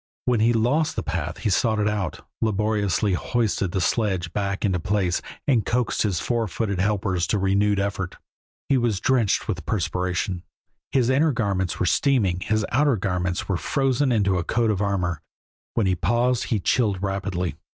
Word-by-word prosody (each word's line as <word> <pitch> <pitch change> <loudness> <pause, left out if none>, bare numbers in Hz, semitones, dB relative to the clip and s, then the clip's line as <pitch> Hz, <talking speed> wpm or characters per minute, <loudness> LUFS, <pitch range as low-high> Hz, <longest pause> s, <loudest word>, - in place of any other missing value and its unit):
When 125 -3 +2
he 115 +2 +4
lost 125 +8 +1
the - - -2
path 80 +1 -3
he 105 - -1
sought 110 +3 +2
it 105 0 +1
out, 100 -7 -3 0.2
laboriously 105 -2 +1
hoisted 105 -2 0
the 95 - -1
sledge 95 -3 0
back 100 0 -1
into 95 -3 +1
place, 95 -1 0 0.3
and 125 -6 +3
coaxed 120 +3 0
his 100 -6 +1
four 120 -2 -1
footed 100 +1 -2
helpers 95 -3 0
to 105 - +1
renewed 100 +1 +2
effort. 95 -2 -3 0.5
He 135 -2 +3
was 115 -5 0
drenched 125 -5 +1
with - - -3
perspiration, 90 0 -1 0.5
his 130 -2 +2
inner 150 +4 +3
garments 100 -7 -1
were - - +1
steaming, 95 - +2
his 110 +3 0
outer 140 -3 +3
ones 90 -2 -1
were 95 - 0
frozen 135 +4 +1
into 100 -5 +2
a - - -2
coat 115 +4 +1
of 100 -2 -1
armor; 90 -5 -1 0.5
when 115 - +2
he 95 - +2
paused 120 +8 +1
he 110 - 0
chilled 100 -3 +1
rapidly. 95 -3 -2
100 Hz, 170 wpm, -24 LUFS, 95-115 Hz, 0.5 s, he